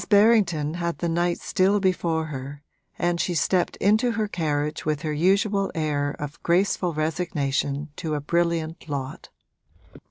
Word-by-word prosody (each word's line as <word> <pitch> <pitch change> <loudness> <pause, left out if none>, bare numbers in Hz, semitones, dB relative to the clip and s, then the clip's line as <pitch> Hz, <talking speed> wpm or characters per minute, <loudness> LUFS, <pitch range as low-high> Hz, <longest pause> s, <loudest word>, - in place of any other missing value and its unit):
Berrington 200 -8 +4
had 170 0 -2
the 170 - -2
night 170 +1 0
still 195 +2 +2
before 170 -4 0
her, 140 -1 -7 0.3
and 175 0 0
she 175 - -1
stepped 180 +2 +1
into 220 +4 +2
her 220 -2 -1
carriage 150 -5 -2
with 155 -1 -1
her 155 -1 -1
usual 195 +5 +2
air 145 -2 -1
of 145 -1 -7
graceful 180 0 +1
resignation 150 -3 -1
to 160 -3 -2
a - - -1
brilliant 165 +1 -1
lot. 135 -2 -5
165 Hz, 140 wpm, -25 LUFS, 150-185 Hz, 0.3 s, Berrington